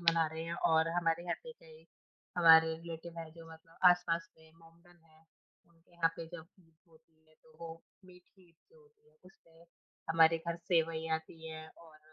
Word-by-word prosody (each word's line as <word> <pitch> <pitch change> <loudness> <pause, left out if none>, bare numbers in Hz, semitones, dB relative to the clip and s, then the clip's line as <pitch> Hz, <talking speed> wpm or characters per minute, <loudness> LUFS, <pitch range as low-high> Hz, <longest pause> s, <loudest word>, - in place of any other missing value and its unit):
मना 165 -1 +3
रहे 160 +1 -6
हैं 165 +1 -4 0.2
और 160 0 +3
हमारे 170 -1 0
यहाँ 175 - -1
पे 480 - -9
कई 480 0 -18 0.5
हमारे 160 -1 +7
रिलेटिव 165 0 -9
हैं 165 -1 -7
जो 165 0 -13
मतलब 165 +1 -18
आस-पास 170 -1 0
के 160 -1 -23
मोहम्मदन 170 +2 -21
हैं। 160 0 -25 0.4
उनके 165 0 -30
यहाँ 165 -1 +2
पे 165 - -7
जब 165 -2 -9
ईद 165 -2 -27 0.2
होती 160 0 -27
है 155 - -26
तो 160 - -22
वो 165 0 -9 0.2
मीठी 180 0 -20
ईद 170 - -28 0.2
जो 480 - -21
होती 450 0 -27
है 475 - -30
उस 435 - -19
में 165 0 -21 0.5
हमारे 165 0 +5
घर 170 0 -2
सेवई 165 -2 0
आती 160 0 -7
हैं 160 0 -8
और 160 -2 -17
165 Hz, 195 wpm, -33 LUFS, 160-175 Hz, 0.5 s, हमारे